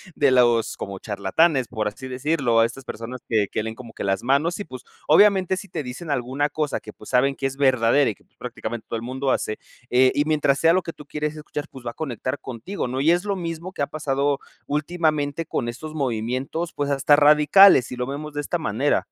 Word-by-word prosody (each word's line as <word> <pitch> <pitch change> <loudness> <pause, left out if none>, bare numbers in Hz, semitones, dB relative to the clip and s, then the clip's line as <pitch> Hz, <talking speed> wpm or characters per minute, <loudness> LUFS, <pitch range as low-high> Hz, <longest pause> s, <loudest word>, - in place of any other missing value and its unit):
de 140 -2 +3
los 120 -3 +3
como 100 -1 -6
charlatanes, 115 - +1
por 110 -3 -2
así 130 +5 -7
decirlo, 130 -2 +1
a 115 - +6
estas 125 +4 -6
personas 120 +1 -7
que 110 -3 +2
que 110 - -2
leen 110 0 -5
como 115 -2 -11
que - - -6
las 95 +1 0
manos, 140 +8 +1
y 205 - -4
pues, 130 -3 -10 0.2
obviamente, 190 +2 +5
si 195 +1 -8
te - - -4
dicen 130 +6 -6
alguna 135 +3 -1
cosa 150 -2 -2
que, 105 - -10
pues, 105 - -14
saben 135 +2 +2
que 135 - -3
es 135 0 -1
verdadera, 130 0 +3
y 105 - -4
que, - - -28
pues, - - -41
prácticamente 120 -2 -6
todo 115 - -2
el 110 - -7
mundo 130 +2 -2
hace. 110 - -1 0.3
Eh, 130 +1 +5
y 145 - +2
mientras 145 -3 +2
sea 165 0 +5
lo 185 - +2
que 165 - -5
tú 150 - -14
quieres 150 +1 -3
escuchar, 150 -1 -6
pues, 130 -2 -13
va 120 - -2
a - - -19
conectar 130 -1 -4
contigo, 130 - -5
¿no?, 130 +2 -3
y 150 +4 +4
es 175 +2 +2
lo 200 -1 -2
mismo 170 +1 -5
que 180 - -6
ha - - -1
pasado 140 -2 -1 0.3
últimamente 155 0 -1
con 120 - -2
estos 155 +6 -7
movimientos, 130 +5 -2
pues, 145 -1 -2
hasta 140 +1 +4
radicales, 150 +2 +6
y - - -4
lo 125 0 -2
vemos 145 +3 -6
de 145 - -2
esta 145 - -2
manera. - - +1
140 Hz, 230 wpm, -23 LUFS, 120-155 Hz, 0.3 s, a